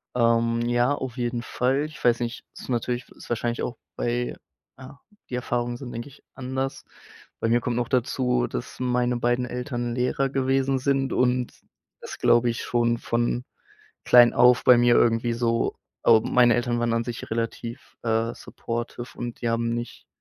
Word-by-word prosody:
Ähm, 115 0 +2
ja, 120 +3 +2
auf 130 -3 -5
jeden 120 -1 -2
Fall. 130 +4 0
Ich 155 0 -10
weiß 120 -1 +4
nicht, 120 0 -4
ist - - -11
natürlich 120 0 -2
ist - - -14
wahrscheinlich 120 0 -1
auch 120 - -4 0.2
bei 120 +1 -2 0.4
ja, 135 +2 -12 0.3
die 125 - -3
Erfahrungen 120 -1 -2
sind, 125 -2 -8
denke 120 +5 -6
ich, 140 - -19
anders. 130 +1 -4 0.6
Bei - - 0
mir 120 +1 +3
kommt 120 0 -2
noch 120 - 0
dazu, 125 - +1
dass - - -6
meine 125 -1 +1
beiden 120 +1 +1
Eltern 120 -1 -4
Lehrer 130 +2 0
gewesen 135 0 +1
sind, 135 0 0
und 125 -1 +1 0.5
das - - -8
glaube 120 0 +4
ich 115 - -3
schon 120 -1 +1
von 120 +1 -1 0.6
klein 120 -1 +7
auf 125 0 +5
bei 125 -1 +7
mir 120 0 +5
irgendwie 115 0 +3
so 115 -1 0 0.3
ähm, 115 -1 +5
meine 120 -1 +5
Eltern 120 0 0
waren 120 -1 +1
an 115 0 0
sich 120 -2 -6
relativ, 115 +2 -4
äh, 115 0 0
supportive 120 +1 -6
und 120 -1 -5
die 120 - 0
haben 115 0 0
nicht, 120 0 -6
120 Hz, 170 wpm, -25 LUFS, 120-125 Hz, 0.6 s, klein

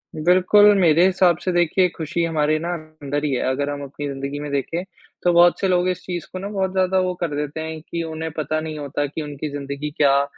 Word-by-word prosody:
बिल्कुल, 185 +6 +5
मेरे 170 -1 +5
हिसाब 185 -3 +3
से 185 - +1
देखिए 175 +1 +3
खुशी 165 +1 -2
हमारे 155 -2 +1
ना 170 +2 -3
अंदर 155 -3 -5
ही 145 - 0
है। 125 - 0
अगर 140 +2 -1
हम 145 0 -4
अपनी 145 +1 -6
ज़िंदगी 140 +1 -4
में 145 0 -5
देखें, 140 +5 -2 0.4
तो 175 - +3
बहुत 175 0 +5
से 195 - +1
लोग 180 0 +2
इस 180 - -3
चीज़ 175 -3 -5
को 185 - -4
ना 195 - -5
बहुत 190 -2 -1
ज़्यादा 190 0 +2
वो 185 0 0
कर 165 -4 -1
देते 150 +1 -3
हैं 160 0 -5
कि 170 0 -3
उन्हें 160 0 -5
पता 155 +1 -1
नहीं 155 -1 -5
होता 145 0 -2
कि 145 +3 -5
उनकी 150 0 -5
ज़िंदगी 140 +1 -4
क्या 140 -1 +4
160 Hz, 230 wpm, -22 LUFS, 145-180 Hz, 0.4 s, बिल्कुल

